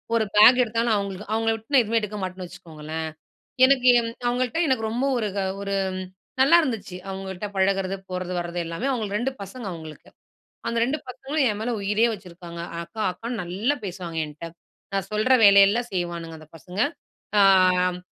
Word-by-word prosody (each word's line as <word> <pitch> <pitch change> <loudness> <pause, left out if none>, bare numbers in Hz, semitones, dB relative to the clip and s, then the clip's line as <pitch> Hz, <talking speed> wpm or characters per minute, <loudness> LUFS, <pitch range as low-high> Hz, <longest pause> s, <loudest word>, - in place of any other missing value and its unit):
ஒரு 225 - +3
பேக் 220 +5 +8
எடுத்தாலும் 230 -1 +1
அவங்களுக்கு. 200 0 -4
அவுங்கள 225 0 +1
விட்டு 225 +6 -12
நான் 255 -3 +6
எதுவுமே 225 +1 +1
எடுக்க 210 0 -5
மாட்டேன்னு 185 0 -5
வச்சுக்கோங்களேன். 160 -2 -7 0.6
எனக்கு 260 -2 +3
என் 230 -1 -2 0.2
அவங்கள்ட்ட 250 +4 -1
எனக்கு 255 -4 +1
ரொம்ப 245 +4 -1
ஒரு 215 -3 -1
க - - +1 0.2
ஒரு 200 0 -3 0.2
ம் 185 - -4 0.4
நல்லாயிருந்துச்சு. 260 - +3
அவங்கள்ட்ட 190 +1 -5
பழகுறது 195 0 +1
போறது 185 0 -4
வரது 175 0 -4
எல்லாமே. 170 +11 -3
அவங்களுக்கு 215 -5 -2
2 265 +2 -1
பசங்க 210 +4 -8
அவங்களுக்கு. 160 -2 -10 0.6
அந்த 230 0 -1
ரெண்டு 290 +5 -1
பசங்களும் 270 +3 -1
என் 210 - -4
மேல 240 +2 -2
உயிரே 210 +4 +2
வச்சுருக்காங்க. 175 -3 -9 0.2
அக்கா, 220 +6 -9
அக்கான்னு 230 +3 -5
நல்லா 200 +11 -1
பேசுவாங்க 175 -3 -5
என்ட்ட. 155 +3 -9 0.4
நான் 195 -1 -1
சொல்கிற 215 +5 +2
வேலையெல்லாம் 200 +4 +6
செய்வானுங்க 170 -2 -4
அந்த 155 - -15
பசங்க. 180 +5 -7 0.6
அ - - +7 0.6
ம் 180 - -12
200 Hz, 165 wpm, -24 LUFS, 180-235 Hz, 0.6 s, பேக்